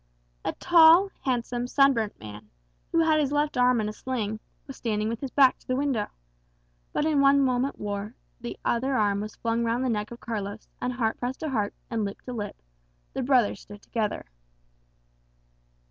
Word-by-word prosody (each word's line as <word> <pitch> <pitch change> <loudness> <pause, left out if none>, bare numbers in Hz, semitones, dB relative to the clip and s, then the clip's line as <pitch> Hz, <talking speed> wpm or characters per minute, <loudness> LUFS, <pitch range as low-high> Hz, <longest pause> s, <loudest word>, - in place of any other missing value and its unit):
A - - -1
tall, 345 +3 +6
handsome, 245 -1 -1
sunburnt 255 -6 +2
man, 105 0 -10 0.4
who 330 - +3
had 310 -1 +4
his 285 -2 +1
left 295 +1 0
arm 250 -1 +4
in 215 - -1
a 210 - -4
sling, 220 -4 -3 0.3
was 270 - -9
standing 215 -2 -1
with 230 0 -3
his 275 - -3
back 265 -1 +4
to - - -26
the 255 - 0
window. 265 -6 0 0.8
But 295 - 0
in 305 -3 +3
one 280 0 +5
moment 260 0 +1
more 205 +2 -4 0.2
the 240 0 -6
other 260 +3 +1
arm 205 -3 +2
was 215 0 -6
flung 230 0 -1
round 235 +3 0
the - - +1
neck 210 -2 -1
of 235 - -10
Carlos, 210 -2 -5
and 250 - -1
heart 230 -3 -1
pressed 250 +2 -4
to 310 - -2
heart, 210 -5 -1 0.2
and 225 -2 0
lip 200 0 -4
to 250 - -6
lip 205 -3 -5 0.5
the - - -2
brothers 245 -6 +2
stood 205 0 -13
together. 220 -3 -2
240 Hz, 185 wpm, -27 LUFS, 215-270 Hz, 0.8 s, tall